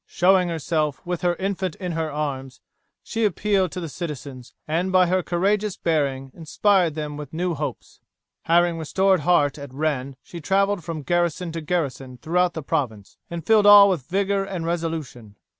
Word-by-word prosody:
Showing 185 0 +3
herself, 155 -2 -1
with 175 -1 -3
her 175 -1 +1
infant 190 -2 -3
in 180 -2 -5
her 160 -1 -2
arms, 135 -3 -4 0.4
she 225 0 -3
appealed 195 -2 +1
to 185 - -4
the 170 - -5
citizens, 140 -4 -7 0.2
and 170 +4 -1
by 185 -1 +5
her 185 +1 +1
courageous 200 +4 0
bearing 140 -5 -1
inspired 175 0 +1
them 150 -1 -5
with 150 -2 -8
new 175 +2 -1
hopes. 145 -4 -6 0.5
Having 170 0 +3
restored 190 +4 +2
heart 145 -3 +2
at 140 -2 -9
Rennes 140 -2 -2
she 170 - -9
traveled 195 +2 +1
from 160 -3 -5
garrison 175 +1 0
to 165 0 -5
garrison 140 -6 -3
throughout 175 +6 0
the 160 - -5
province, 125 -10 -3
and 170 -2 -6
filled 215 -2 +5
all 205 -1 +9
with 150 -8 -3
vigour 195 +1 0
and 190 -4 -5
resolution. 160 -10 -4
165 Hz, 170 wpm, -23 LUFS, 150-185 Hz, 0.5 s, all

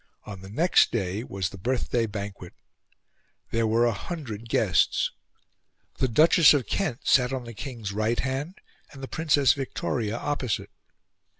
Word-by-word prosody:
On 100 -3 -8
the 95 - -10
next 165 - +3
day 100 -1 -2
was 95 -6 -3
the 95 - -11
birthday 120 +1 0
banquet; 100 -4 -7 1.0
there 115 -1 +1
were 115 +2 +3
a 120 - +3
hundred 115 - -6
guests; 95 -7 +2 0.9
the 130 - +2
Duchess 155 +5 +6
of 135 -5 0
Kent 165 -11 -2
sat 125 -1 +3
on 130 -2 -3
the 115 0 -9
King's 115 -3 -6
right 110 +3 0
hand, 135 +7 -3 0.3
and 135 -1 -11
the - - -4
Princess 145 -6 +3
Victoria 120 -4 -3
opposite. 130 -4 -2
120 Hz, 145 wpm, -26 LUFS, 105-135 Hz, 1.0 s, Duchess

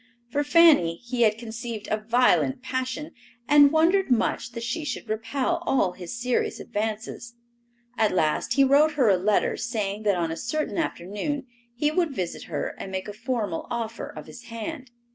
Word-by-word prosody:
For 290 +3 +1
Fanny 290 - +5
he 240 +6 -4
had 215 -2 +4
conceived 230 -1 -6
a 215 - +2
violent 250 +3 +2
passion 260 +3 -3 0.4
and 290 -1 +7
wondered 340 +4 +3
much 240 0 0
that 230 -1 -5
she 305 +7 -2
should 260 -4 -4
repel 230 +5 -1
all 195 -9 +2
his 180 +6 -7
serious 250 0 0
advances. 220 +2 -4 0.6
At 220 -1 +3
last 160 +5 +1
he 275 - +6
wrote 290 +3 +5
her 265 -7 +3
a 195 - +5
letter 200 +3 +1
saying 215 -3 -2
that 205 -2 +2
on 165 -2 -1
a 165 - -4
certain 305 - -2
afternoon 265 - -3 0.3
he 295 +5 +1
would 315 -4 0
visit 180 -5 -4
her 150 -4 -3
and 190 - -6
make 190 +1 -4
a 205 - -6
formal 230 -6 -3
offer 230 -1 -4
of - - -9
his 240 - -12
hand. 245 +4 -6
235 Hz, 175 wpm, -25 LUFS, 210-275 Hz, 0.6 s, and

